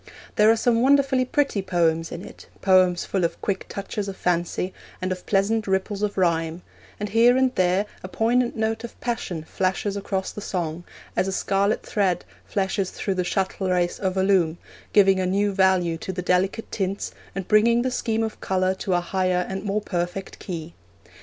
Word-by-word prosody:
There 215 +1 +5
are 225 - +6
some 230 +1 +2
wonderfully 270 -1 +4
pretty 275 -6 +1
poems 165 -3 +1
in 175 +4 -6
it, - - -13
poems 185 -2 +4
full 190 -2 -1
of 170 - -1
quick 195 -2 -2
touches 200 +1 -4
of 195 -1 -6
fancy, 180 +1 -1 0.3
and 185 0 -2
of 185 -1 -5
pleasant 210 +2 +1
ripples 195 +1 -1
of 210 -1 -1
rhyme; 165 -1 +1 0.4
and 210 0 -3
here 235 +4 +5
and 260 -1 +2
there 185 +2 +2 0.2
a - - -6
poignant 235 +5 +1
note 220 0 -1
of 235 - -9
passion 205 -9 -3
flashes 190 +4 -1
across 195 -1 -2
the 210 - -7
song, 175 -3 -3 0.3
as 185 - +1
a - - -1
scarlet 195 +2 +1
thread 195 -4 0 0.2
flashes 190 -1 -1
through 195 - -2
the 185 -1 0
shuttlerace 185 -1 0
of 190 -1 -1
a 190 - +3
loom, 180 -4 +3 0.3
giving 195 -2 +5
a 185 - 0
new 200 +2 +1
value 185 -4 +2
to 190 - -4
the 180 -1 -4
delicate 190 +5 0
tints, 195 0 -2 0.2
and 195 -2 -4
bringing 230 +3 +4
the 255 - 0
scheme 225 -3 0
of 220 -1 -5
colour 185 0 +1
to 190 -1 -1
a 175 - +2
higher 185 0 0
and 190 0 -4
more 210 0 -1
perfect 175 0 -4
key. 170 -3 -6
190 Hz, 185 wpm, -24 LUFS, 180-210 Hz, 0.4 s, are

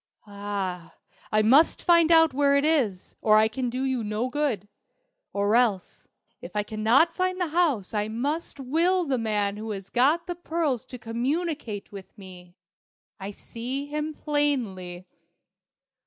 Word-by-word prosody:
Ah, 200 -4 -5 0.4
I 215 0 +3
must 275 +9 +4
find 340 -1 +5
out 325 -3 +6
where 280 +1 +3
it 280 +1 +2
is, 250 - 0
or 215 -1 +5
I 215 0 +5
can 245 +3 -3
do 255 +2 -3
you 260 -3 -1
no 215 +4 -2
good. 255 -9 -1 0.6
Or 200 +2 +1
else 225 -6 0 0.3
if - - -10
I 210 - +1
cannot 225 +10 +2
find 370 +1 -1
the 355 -3 -1
house 300 - 0
I 210 0 0
must 280 +8 -3
will 335 +7 +1
the 265 -4 0
man 210 -2 0
who 220 +1 -6
has 195 -2 -6
got 295 +8 +3
the 350 - -3
pearls 325 -7 -2
to 250 - -8
communicate 245 - -3
with 200 +1 -11
me. 180 -2 -12 0.6
I 195 +1 -5
see 245 +6 -6
him 300 +1 -4
plainly." 230 - -2
245 Hz, 155 wpm, -26 LUFS, 205-300 Hz, 0.6 s, out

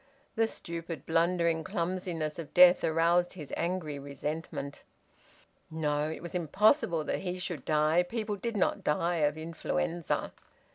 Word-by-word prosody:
The 225 0 +3
stupid, 170 -6 -6
blundering 165 0 +2
clumsiness 170 -2 -2
of 155 -3 -8
death 180 0 +8
aroused 170 +2 +2
his 155 -7 -9
angry 170 -5 -2
resentment. 140 +1 -5 0.9
No! 150 -1 -1
It 160 - -6
was 170 - -7
impossible 180 - +2
that - - -2
he 180 -1 -3
should 175 -6 -5
die! 155 +2 +3
People 215 +3 -3
did 220 +3 -3
not 190 - +1
die 170 +3 +1
of 150 -1 +1
influenza. 165 +1 -2
165 Hz, 135 wpm, -30 LUFS, 155-180 Hz, 0.9 s, death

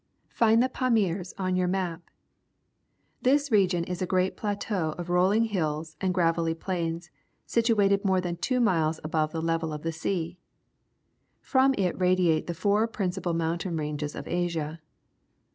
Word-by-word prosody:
Find 230 +1 +4
the 260 - +1
Eamirs 200 -9 0
on 185 -1 -1
your 180 0 +1
map. 180 -2 -3 1.1
This 280 +2 +2
region 185 -5 +3
is 180 +1 -5
a 185 - 0
great 185 +1 +1
plateau 200 -6 -2
of 175 0 -5
rolling 190 +5 +3
hills 160 -7 -2
and 190 -1 +1
gravelly 165 -2 +1
plains, 170 -1 -3 0.3
situated 205 -4 +2
more 190 -2 +2
than 175 -1 -3
two 255 +6 0
miles 165 -8 +2
above 155 0 0
the 160 -1 -3
level 165 -1 0
of 150 -1 -6
the 165 - -1
sea. 170 +1 -3 1.0
From 270 0 +3
it 185 -1 -1
radiate 180 -3 +2
the 170 - -3
four 205 +5 +2
principal 185 -5 -2
mountain 165 +1 -1
ranges 150 -1 -3
of - - -7
Asia. 165 -3 -2
180 Hz, 150 wpm, -27 LUFS, 165-200 Hz, 1.1 s, Find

